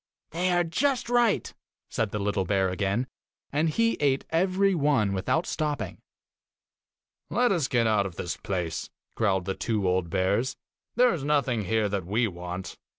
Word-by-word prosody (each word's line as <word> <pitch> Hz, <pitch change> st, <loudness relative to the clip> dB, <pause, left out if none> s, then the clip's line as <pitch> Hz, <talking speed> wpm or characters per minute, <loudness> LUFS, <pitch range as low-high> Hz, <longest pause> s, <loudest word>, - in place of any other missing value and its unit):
'They 180 Hz, +3 st, 0 dB
are 175 Hz, -1 st, +3 dB
just 240 Hz, -, 0 dB
right!' 240 Hz, -3 st, +2 dB, 0.3 s
said 110 Hz, -2 st, -1 dB
the 105 Hz, -, -3 dB
little 100 Hz, -1 st, 0 dB
bear 95 Hz, 0 st, +1 dB
again, 100 Hz, +6 st, 0 dB, 0.5 s
and 155 Hz, +3 st, +1 dB
he 230 Hz, +7 st, +1 dB
ate 135 Hz, -2 st, +1 dB
every 190 Hz, +4 st, +2 dB
one 140 Hz, -, +2 dB
without 100 Hz, -, 0 dB
stopping. 150 Hz, -2 st, -3 dB, 1.3 s
'Let 245 Hz, -1 st, +2 dB
us 165 Hz, -8 st, +1 dB
get 120 Hz, -3 st, +2 dB
out 105 Hz, -3 st, +2 dB
of 90 Hz, -, -11 dB
this 85 Hz, -, -3 dB
place,' 85 Hz, -7 st, -3 dB, 0.2 s
growled 95 Hz, -5 st, +1 dB
the 95 Hz, -, -1 dB
two 105 Hz, -2 st, -1 dB
old 90 Hz, -2 st, +1 dB
bears; 100 Hz, +8 st, 0 dB, 0.4 s
'there 250 Hz, 0 st, +5 dB
is 160 Hz, -6 st, -4 dB
nothing 135 Hz, -7 st, +1 dB
here 110 Hz, +2 st, +1 dB
that 100 Hz, -3 st, -3 dB
we 115 Hz, +4 st, +2 dB
want. 90 Hz, 0 st, -6 dB
115 Hz, 160 wpm, -27 LUFS, -, 1.3 s, there